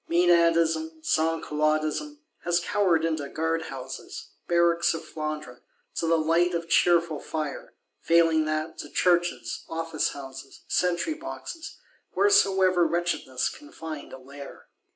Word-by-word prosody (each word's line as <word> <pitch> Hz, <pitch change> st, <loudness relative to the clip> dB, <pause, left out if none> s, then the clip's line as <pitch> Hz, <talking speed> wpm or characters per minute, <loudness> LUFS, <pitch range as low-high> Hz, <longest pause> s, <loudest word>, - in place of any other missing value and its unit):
Menadism, 165 Hz, -2 st, +3 dB
Sansculottism 155 Hz, -, 0 dB, 0.2 s
has 175 Hz, 0 st, +1 dB
cowered 175 Hz, -2 st, +2 dB
into 155 Hz, -4 st, -2 dB
guard 160 Hz, +1 st, -1 dB
houses, 130 Hz, 0 st, -8 dB, 0.2 s
barracks 170 Hz, -1 st, +3 dB
of -, -, -6 dB
Flandre, 155 Hz, -5 st, -5 dB, 0.3 s
to 165 Hz, -, -2 dB
the 165 Hz, 0 st, +4 dB
light 170 Hz, +3 st, +2 dB
of 170 Hz, 0 st, -3 dB
cheerful 170 Hz, -3 st, +3 dB
fire; 155 Hz, -1 st, -5 dB, 0.2 s
failing 165 Hz, -2 st, +3 dB
that, 155 Hz, +1 st, -3 dB
to 145 Hz, -, -7 dB
churches, 175 Hz, -11 st, +1 dB
office 165 Hz, -1 st, -2 dB
houses, 135 Hz, -1 st, -10 dB
sentry 180 Hz, -, +1 dB
boxes, 320 Hz, 0 st, -8 dB, 0.4 s
wheresoever 190 Hz, -, +4 dB
wretchedness 170 Hz, -6 st, -1 dB
can 295 Hz, 0 st, -13 dB
find 155 Hz, -3 st, -7 dB
a -, -, -8 dB
lair. 140 Hz, +2 st, -12 dB
165 Hz, 120 wpm, -26 LUFS, 155-175 Hz, 0.4 s, the